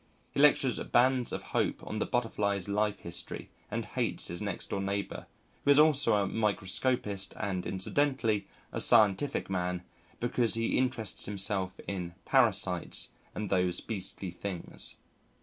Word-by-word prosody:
He - - -3
lectures 140 -3 +4
Bands 125 0 +2
of - - -4
Hope - - 0
on 110 - -4
the - - -1
Butterfly's 100 -5 0
Life 105 +1 0
History 85 0 -3 0.2
and - - -3
hates - - -1
his 85 - -5
next 100 -1 -3
door 100 - -1
neighbour, 100 +1 -3 0.4
who - - 0
is 140 - +7
also 150 -4 +5
a 100 -1 +2
microscopist 105 0 0
and 95 -4 -2
incidentally 110 0 0 0.2
a - - -2
scientific 105 +6 +4
man, 90 -1 -2 0.4
because 120 -1 +1
he 115 0 0
interests 125 -6 0
himself 95 -2 0
in 90 -3 -4
"parasites - - +2 0.2
and 105 -2 -4
those 90 -2 +2
beastly 95 -3 -4
things." 90 0 0
100 Hz, 140 wpm, -30 LUFS, 95-120 Hz, 0.4 s, is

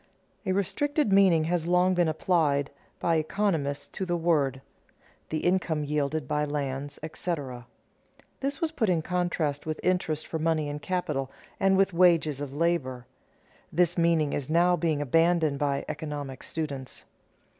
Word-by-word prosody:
A - - +2
restricted 205 - 0
meaning 190 -5 +5
has 165 0 -1
long 180 +1 +3
been 175 -2 +2
applied 155 -3 +1 0.3
by 165 -1 +2
economists 155 -4 -1
to - - -5
the 175 -2 0
word: 145 -6 +1 0.7
the 155 - -2
income 175 -4 +1
yielded 150 -1 -1
by 150 +1 0
lands, 145 -1 -3
etc. 145 -7 -4 0.7
This 275 0 -2
was 325 -2 -1
put 230 -10 0
in 165 -3 +1
contrast 170 -5 -1
with 155 0 -3
interest 170 -4 0
for 160 - -4
money 160 -1 +1
and 145 0 -5
capital, 155 -8 -2 0.3
and 195 0 +4
with 195 -1 +3
wages 165 -5 +3
of 145 -2 -4
labor. 140 -5 -1 0.7
This 175 +1 +2
meaning 165 -4 +2
is 140 -1 -3
now 175 +2 +4
being 155 -3 0
abandoned 165 0 +2
by 140 -1 0
economic 145 -4 -5
students. 140 -5 -5
160 Hz, 145 wpm, -27 LUFS, 145-180 Hz, 0.7 s, meaning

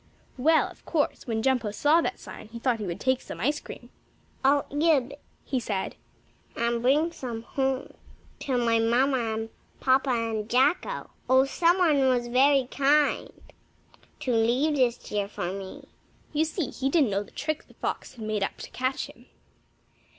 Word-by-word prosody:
Well, 315 +5 +4
of - - -15
course, 295 -3 -1
when 220 -1 -1
Jumpo 250 -4 +1
saw 295 +10 +3
that - - -2
sign - - -10
he 230 +2 -9
thought 235 -1 0
he 210 - -4
would 170 +2 -4
take 260 +2 +1
some - - -8 0.3
cream. - - -10 0.5
"I'll 280 +1 +4
eat 305 +4 +3
a - - +1
bit," 280 +4 -12 0.2
he 265 - -1
said, 200 -5 -3 0.6
"and 235 0 0
bring 295 +7 +3
some 235 -7 -6
home 265 +1 -2 0.5
to 260 -3 -1
my 230 -2 +2
mamma 235 0 +2
and 225 0 -4 0.3
papa 265 +1 +3
and 225 -3 -1
Jacko. 265 +8 +1 0.2
Oh, 260 +1 +6
some 340 +6 +2
one 295 -7 +4
was 240 -1 +1
very 270 +2 +4
kind 290 +1 +2 0.9
to 250 - 0
leave 245 +7 +2
this 245 -3 +1
here 205 -1 -1
for 180 -3 -4
me." 195 -1 -8 0.5
You 305 +2 +2
see, 320 0 -3
he 270 0 -1
didn't 275 -7 +3
know 195 +1 0
the 205 - -10
trick 310 0 -4
the - - -20
fox - - -4
had 225 -3 -7
made 215 -1 -1
up 195 - -2
to - - -9
catch 255 +1 -1
him. - - -16
255 Hz, 175 wpm, -27 LUFS, 230-285 Hz, 0.9 s, Oh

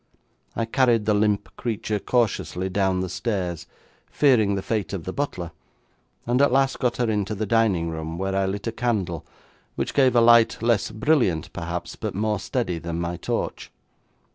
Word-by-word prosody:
I 115 - 0
carried 120 -2 +2
the 105 - +3
limp 105 -1 0
creature 110 -3 -2
cautiously 100 -5 0
down 95 -1 +1
the 95 - -2
stairs, 90 -4 -3 0.4
fearing 115 -8 +3
the 95 - -3
fate 105 -3 -2
of 95 -4 -4
the 95 - -5
butler, 90 - -3 0.7
and 125 +3 +2
at 140 - +4
last 135 +1 +2
got 125 -2 0
her 120 - +1
into 105 -1 -1
the 110 +2 -2
dining 100 -7 +2
room, 80 +1 -5
where 95 +1 -2
I 95 0 +1
lit 100 +1 -4
a 115 - -1
candle, 110 - -1 0.5
which - - -2
gave 130 -3 +4
a - - +7
light 115 -1 +6
less 115 -4 +2
brilliant, 110 - +1
perhaps, 85 +1 -5
but - - -5
more 105 0 0
steady 95 -7 -2
than 85 0 -4
my 85 0 -2
torch. - - -3
105 Hz, 175 wpm, -24 LUFS, 90-120 Hz, 0.7 s, a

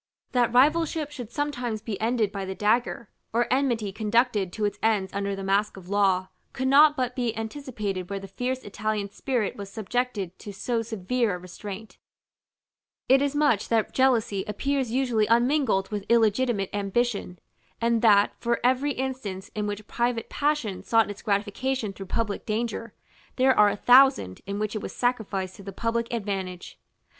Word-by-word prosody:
That 245 -2 +2
rivalship 300 +3 +3
should 245 -6 -7
sometimes 245 -5 -2
be 210 -2 -5
ended 225 -2 +1
by 200 -1 -4
the 190 0 -5
dagger, 225 +1 0 0.2
or 235 +2 +2
enmity 240 -7 0
conducted 215 -2 +1
to 215 - -1
its 205 0 -2
ends 210 -4 +1
under 200 0 -2
the 195 - -6
mask 195 +1 +1
of 185 -1 -12
law, 195 -2 +2 0.2
could 260 - -2
not 295 +2 +6
but 250 -1 -1
be 240 -3 -1
anticipated 220 -6 -4
where 200 - -3
the 195 0 -7
fierce 250 +6 -3
Italian 205 0 -3
spirit 245 -2 -1
was 200 -1 -7
subjected 215 -3 -3
to 205 - -8
so 230 +4 -2
severe 225 0 -1
a - - -5
restraint: 195 +4 -9 1.1
it 265 +1 +5
is 285 0 0
much 290 -9 +2
that 225 -2 +1
jealousy 230 -7 +2
appears 265 +4 -1
usually 240 -3 +1
unmingled 240 -4 +2
with 205 -2 -4
illegitimate 225 -2 +2
ambition, 205 -2 -1 0.4
and 230 -1 +2
that, 205 -3 +5
for 235 0 0
every 260 +3 +2
instance 255 -8 -4
in 210 -1 -2
which 205 0 -5
private 235 0 -1
passion 285 -10 -1
sought 225 -2 +2
its 200 - -10
gratification 210 +2 -1
through 195 0 -9
public 210 0 -2
danger, 230 0 -3 0.4
there 260 0 +4
are 210 0 +6
a - - -2
thousand 245 - +5
in 200 0 -3
which 215 +1 -2
it 215 - -2
was - - -7
sacrificed 205 -6 -1
to - - -11
the 195 0 -7
public 230 +3 -2
advantage. 195 -5 -4
220 Hz, 170 wpm, -26 LUFS, 200-250 Hz, 1.1 s, not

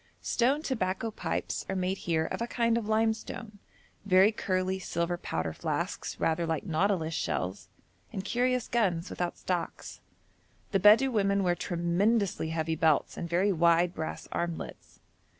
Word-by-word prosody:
Stone 270 +6 +1
tobacco 220 -5 -1
pipes - - -3
are 195 - -1
made 185 +1 -1
here 160 -1 +2
of - - -4
a 235 - -1
kind 235 -1 +1
of 230 -2 -1
limestone, 220 -1 -1 0.4
very 195 +1 +5
curly 185 -2 -1
silver 170 -1 -1
powder 80 - -3
flasks, - - -3
rather 165 +1 +1
like 160 +1 -2
nautilus 170 -1 0
shells, 95 - -3 0.4
and 190 - -5
curious 250 0 +1
guns 190 -7 0
without 175 -1 -3
stocks. 180 -2 -4 0.7
The 195 - +2
Bedou 215 +7 +6
women 200 -3 +2
wear 175 -1 +3
tremendously 175 +2 0
heavy 160 0 -1
belts 160 -2 +2
and 170 - -5
very 185 +4 +2
wide 170 0 +3
brass 160 0 -5
armlets. 170 -1 -5
185 Hz, 145 wpm, -29 LUFS, 170-215 Hz, 0.7 s, Bedou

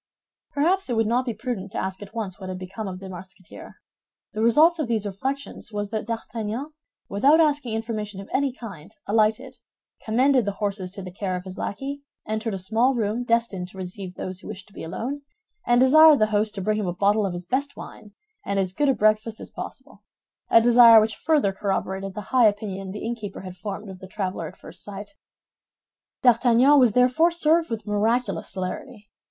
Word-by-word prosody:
Perhaps 345 +4 +1
it 240 - 0
would 225 0 +2
not 245 +4 +1
be 240 - -2
prudent 215 -4 -5
to - - -4
ask 190 +1 -3
at 205 +2 -11
once 205 -5 -4
what 185 -1 -7
had 185 - -4
become 195 +3 -6
of 185 -1 -6
the 195 - -9
Musketeer. 185 0 -11 0.6
The 215 - -3
result 310 +9 +5
of 300 - -1
these 220 -3 -1
reflections 265 +4 -4
was 205 -1 -4
that 220 -1 -3
D'Artagnan, 230 +4 -4 0.4
without 275 +11 +4
asking 290 -7 +1
information 215 -3 -4
of 195 - -9
any 275 0 +1
kind, 205 -9 -10 0.2
alighted, 220 +5 +1 0.5
commended 255 +2 +3
the 205 - -1
horses 200 -2 -3
to 195 - -7
the 185 - -8
care 190 -1 -3
of 180 - -5
his 185 -1 -8
lackey, 275 +6 -4 0.3
entered 220 0 -2
a - - -3
small 225 +8 +1
room 225 +1 -1
destined 230 -6 0
to 190 - -14
receive 185 0 -7
those 185 0 -5
who - - -11
wished 185 0 -8
to - - -23
be - - -8
alone, 245 - -4 0.5
and 240 0 +4
desired 305 +4 +7
the 215 - +4
host 210 +1 +1
to 195 - -4
bring 215 +2 0
him 205 - -2
a 175 - -1
bottle 205 +3 +2
of 185 - -4
his 175 0 -6
best 275 +7 -2
wine 210 -1 -11 0.3
and 200 - -2
as 185 -2 0
good 290 +7 +1
a 270 - +3
breakfast 215 +1 +1
as - - -9
possible—a 230 - -3
desire 235 -1 +8
which 220 0 0
further 295 -11 +1
corroborated 195 -1 -3
the 210 - -4
high 250 -3 +6
opinion 200 -2 -3
the 205 +2 -6
innkeeper 225 -4 -5
had 185 -1 -9
formed 200 +2 -6
of 190 -1 -9
the 190 - -10
traveler 185 -4 -4
at - - -12
first 175 +3 -10
sight. 205 +2 -8 1.1
D'Artagnan 245 +3 +5
was 245 -5 +4
therefore 250 +8 +4
served 335 -1 +2
with 225 -3 -4
miraculous 220 +1 0
celerity. 200 +4 -6
215 Hz, 200 wpm, -24 LUFS, 195-245 Hz, 1.1 s, desire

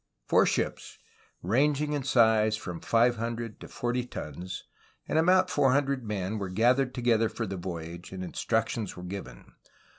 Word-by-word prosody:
Four - - +4
ships, - - -2 0.5
ranging 145 - +2
in 145 - 0
size 110 -4 +4
from 90 -5 -6
five 120 +1 +3
hundred 115 -1 -4
to - - -9
forty 125 0 -2
tons, 90 - -7 0.4
and 160 - +2
about 185 +2 +4
four 135 -3 +3
hundred 140 -2 +1
men 105 -1 -3
were 95 -2 -3
gathered 125 +7 +2
together 115 -3 +2
for 115 - -4
the 95 -1 -4
voyage, 85 -1 -6
and 95 -1 -5
instructions 110 +2 -1
were 90 - -8
given. 90 -10 -8
115 Hz, 155 wpm, -28 LUFS, 95-125 Hz, 0.5 s, Four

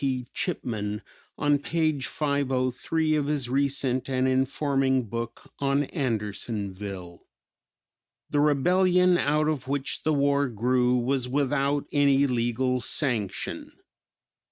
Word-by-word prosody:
P. 130 -2 -1
Chipman 105 -2 -3 0.3
on 145 -1 +2
page 155 -3 0
503 140 +2 0
of 145 -2 0
his 145 -4 -1
recent 135 -1 0
and 130 0 +1
informing 135 0 +1
book 115 +1 -6
on 140 +1 +2
Andersonville: 105 - -4 1.0
"The 145 - 0
rebellion 180 +5 +4
out 150 +1 +2
of 140 -4 -2
which 140 0 -2
the 155 - +1
war 140 -1 +2
grew 125 +2 +1
was 125 +1 0
without 140 +1 0
any 140 -1 +4
legal 125 0 0
sanction. 115 - -2
135 Hz, 105 wpm, -26 LUFS, 125-145 Hz, 1.0 s, rebellion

